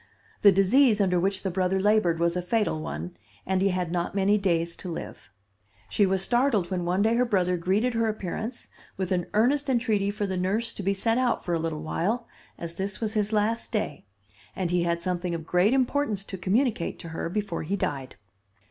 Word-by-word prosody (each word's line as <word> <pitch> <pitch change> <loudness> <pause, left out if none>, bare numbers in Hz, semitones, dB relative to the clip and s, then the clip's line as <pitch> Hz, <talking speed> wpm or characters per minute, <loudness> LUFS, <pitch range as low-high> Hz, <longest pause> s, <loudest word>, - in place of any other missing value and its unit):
The 200 - +8
disease 210 +5 +4
under 180 -3 +2
which 195 +2 -1
the 190 - -1
brother 185 +1 +1
labored 195 -5 +3
was 170 0 +1
a 180 - 0
fatal 210 -3 0
one, 175 +3 -5 0.3
and 190 0 0
he 195 - +3
had 180 -2 -1
not 175 +2 -2
many 200 +1 +3
days 170 -4 0
to 185 - -7
live. 165 - -7 0.6
She 205 - +3
was 190 0 +1
startled 240 -6 +2
when 180 -2 -1
one 180 +3 +1
day 225 +1 +3
her 240 +2 +3
brother 185 -6 +1
greeted 195 +8 +1
her 230 0 +1
appearance, 215 +3 -4 0.3
with 190 -1 -3
an 175 -2 0
earnest 270 +6 +2
entreaty 225 -5 +1
for 205 0 -2
the 190 -2 -2
nurse 210 +6 -1
to - - -6
be 195 +1 0
sent 225 +5 +1
out 250 -2 0
for 175 - -1
a 165 - +1
little 160 -1 -3
while, 215 +9 -1 0.3
as 170 -1 -6
this 195 0 -4
was 220 -2 -2
his 210 -1 0
last 220 +2 0
day, 210 -10 -2 0.5
and 180 -2 -2
he 180 0 +2
had 170 0 -1
something 180 -1 -2
of 160 -1 -6
great 180 +6 +3
importance 260 -5 +1
to 195 - -6
communicate 210 0 0
to 165 - -9
her 160 +1 -4
before 200 -2 -2
he 180 +6 -2
died. 140 -8 -3
195 Hz, 210 wpm, -26 LUFS, 175-220 Hz, 0.6 s, The